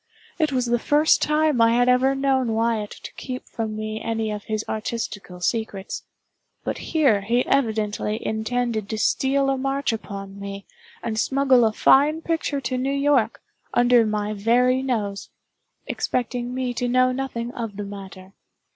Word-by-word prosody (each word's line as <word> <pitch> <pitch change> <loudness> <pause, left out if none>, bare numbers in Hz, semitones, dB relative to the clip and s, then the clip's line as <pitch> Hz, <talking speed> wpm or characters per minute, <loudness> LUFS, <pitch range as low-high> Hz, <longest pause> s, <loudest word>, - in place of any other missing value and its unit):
It 310 -2 +2
was 255 -2 +1
the 240 0 +1
first 295 +5 +3
time 300 -4 +2
I 230 0 +5
had 245 +1 +3
ever 255 +2 +4
known 265 -4 +1
Wyatt 225 -2 0
to - - -10
keep 255 -1 -6
from 220 -2 -4
me 215 0 -4
any 225 -1 -2
of 210 -1 -5
his 215 -1 -2
artistical 215 -4 -4
secrets; 205 -2 -2 0.6
but - - -3
here 270 -11 +2
he 235 +5 +1
evidently 220 -5 0
intended 220 -1 -1
to 220 - -2
steal 275 +5 +2
a 270 - -1
march 275 -1 0
upon 200 -2 -7
me, 200 0 -7 0.4
and 225 -2 -2
smuggle 265 -1 +4
a 220 - +3
fine 295 +8 +4
picture 325 -4 -1
to 255 0 -2
New 265 +2 -1
York, 275 -5 +1 0.3
under 245 -1 +5
my 210 -1 -1
very 245 +5 +3
nose; 215 -7 -2 0.6
expecting 245 0 -2
me 255 -1 -2
to 245 0 -2
know 255 +1 +4
nothing 250 -2 -3
of 225 -4 -5
the 205 - -3
matter. 195 -1 -10
235 Hz, 160 wpm, -23 LUFS, 215-260 Hz, 0.6 s, I